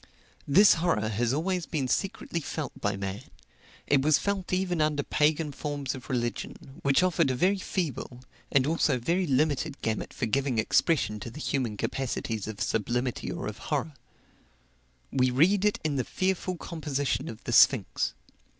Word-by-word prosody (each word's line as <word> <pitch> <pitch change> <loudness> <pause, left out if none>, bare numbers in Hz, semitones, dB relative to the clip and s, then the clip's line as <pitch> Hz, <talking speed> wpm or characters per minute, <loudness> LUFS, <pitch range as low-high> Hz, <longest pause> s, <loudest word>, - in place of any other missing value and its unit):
This 195 +9 +7
horror 110 -12 +1
has 115 +2 0
always 175 +4 -1
been 140 -5 -1
secretly 170 +3 -1
felt 155 -1 -4
by 105 -1 0
man; 100 +2 -4 0.6
it 140 -2 +3
was 150 +1 +4
felt 200 -2 -2
even 180 -3 0
under 150 -1 +1
pagan 150 +1 +1
forms 145 -2 -3
of 130 - -10
religion, 125 +2 -4
which 140 +5 +3
offered 170 -5 +2
a 130 - 0
very 190 +9 +2
feeble, 145 - -3 0.3
and 135 -2 +4
also 155 -2 +2
a - - 0
very 170 +9 0
limited 145 +1 +1
gamut 110 -1 -2
for 125 - -2
giving 135 +2 0
expression 110 0 +2
to 120 - -6
the 135 - -10
human 125 -8 -1
capacities 115 -4 -3
of 110 -2 -6
sublimity 120 0 -1
or - - -5
of - - -5
horror. 155 - -1 1.2
We 130 -1 +3
read 180 +11 +3
it 210 - +2
in 150 -3 0
the 130 - +1
fearful 185 +4 -1
composition 145 -5 -2
of 110 - -9
the - - -4
sphinx. - - +4
140 Hz, 165 wpm, -28 LUFS, 125-165 Hz, 1.2 s, This